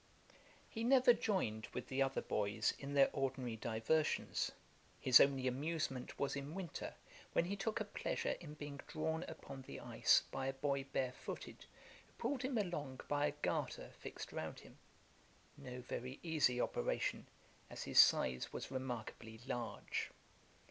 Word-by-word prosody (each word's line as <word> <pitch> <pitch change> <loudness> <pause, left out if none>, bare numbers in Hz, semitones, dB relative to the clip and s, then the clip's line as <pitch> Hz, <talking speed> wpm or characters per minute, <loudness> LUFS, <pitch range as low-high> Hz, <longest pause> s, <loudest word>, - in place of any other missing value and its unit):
He 225 - -4
never 250 0 +7
joined 115 - 0
with 125 - -3
the 135 +1 -1
other 135 0 +1
boys 105 +1 +1
in 140 +1 -5
their 140 -1 +6
ordinary 130 -4 -1
diversions: 115 +8 +1 0.5
his 130 -1 +8
only 135 -2 +4
amusement 135 0 -1
was 140 - 0
in 140 +3 -5
winter, 185 -5 -5 0.4
when 170 - +3
he 195 +3 -2
took 210 +3 -1
a 215 - -1
pleasure 205 - -1
in 150 -3 -9
being 145 -1 -6
drawn 160 +1 -1
upon 135 -4 -8
the - - -8
ice - - +4
by 135 0 -2
a 135 - 0
boy 140 0 0
barefooted, 130 -2 -4 0.4
who - - -27
pulled 280 -3 -1
him 260 -1 0
along 150 -10 -2
by 145 0 +2
a - - 0
garter - - -1
fixed - - -7
round - - -4
him; - - -15 0.8
no 125 -3 -7
very 125 +1 -5
easy 155 -7 +3
operation, - - 0 0.4
as - - -5
his - - +4
size 65 0 +6
was - - -5
remarkably 120 -3 -5
large. 120 -5 -2
135 Hz, 150 wpm, -39 LUFS, 125-160 Hz, 0.8 s, his